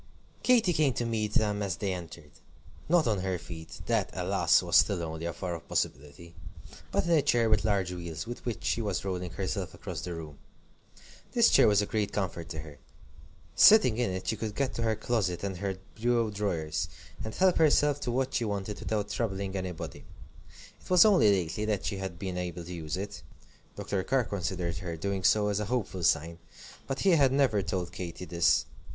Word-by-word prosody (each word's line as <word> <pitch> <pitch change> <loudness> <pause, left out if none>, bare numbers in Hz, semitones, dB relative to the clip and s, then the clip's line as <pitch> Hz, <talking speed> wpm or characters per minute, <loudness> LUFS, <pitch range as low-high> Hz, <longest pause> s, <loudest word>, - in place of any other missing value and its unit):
Katy 230 -8 +4
came 150 -5 +2
to 120 - -2
meet 110 -2 -2
them 105 -1 +1
as 95 -3 -1
they 100 -2 -1
entered. 85 -4 -9 0.6
Not 170 -2 +4
on 105 -4 +1
her 95 -1 -1
feet: 80 -1 -10
that, - - +1
alas! - - +2
was - - +4
still 90 -4 +3
only 80 0 -5
a - - -2
far 85 +1 -4
off 85 - -10
possibility; 75 +5 -3 0.6
but - - +1
in 170 - 0
a 160 -3 +5
chair 120 -5 +2
with 110 - +3
large 100 -4 +1
wheels, 85 -3 -6
with 120 +1 -7
which 120 -3 -4
she 115 - 0
was 100 -3 -2
rolling 90 -2 -3
herself 95 0 -4
across 90 -6 -6
the 90 0 -5
room. 75 -3 -9 0.9
This - - +5
chair - - +6
was 105 -1 +4
a - - -1
great 105 -1 -1
comfort 85 -4 -3
to 80 -2 -5
her. 75 -3 -12 0.8
Sitting 205 - +7
in 120 - +1
it, 95 0 -4
she 110 - +1
could 110 -2 -5
get 135 0 -1
to - - -4
her 110 -1 +1
closet 100 -7 -1
and 95 -2 -3
her 95 0 -3 0.2
bureau 115 -1 +1
drawers, 85 -6 -2 0.3
and 110 - -6
help 185 -1 +3
herself 150 -2 +4
to 130 - -3
what 130 +2 -1
she 120 - +1
wanted 100 -1 -3
without 105 -2 -2
troubling 100 -3 -2
anybody. 90 -6 -5 0.8
It - - -15
was 180 0 +7
only 190 - +5
lately 95 +2 -1
that 105 -3 -1
she 100 - -2
had 95 -3 -5
been 90 0 -4
able 90 -1 -4
to 90 +2 -8
use 80 0 -4
it. 100 +2 -6 0.5
Dr. 95 -2 -2
Carr 135 +3 +1
considered 90 -4 -3
her 85 0 -5
doing 100 +2 -2
so 105 +1 +4
as 100 0 0
a 105 - -2
hopeful 105 -5 -2
sign, 85 +1 +1 0.5
but 135 - -3
he 195 - +4
had 140 -6 +5
never 130 -7 +2
told 90 -2 -3
Katy 90 0 -6
this. 85 -1 +2
100 Hz, 200 wpm, -29 LUFS, 85-115 Hz, 0.9 s, Sitting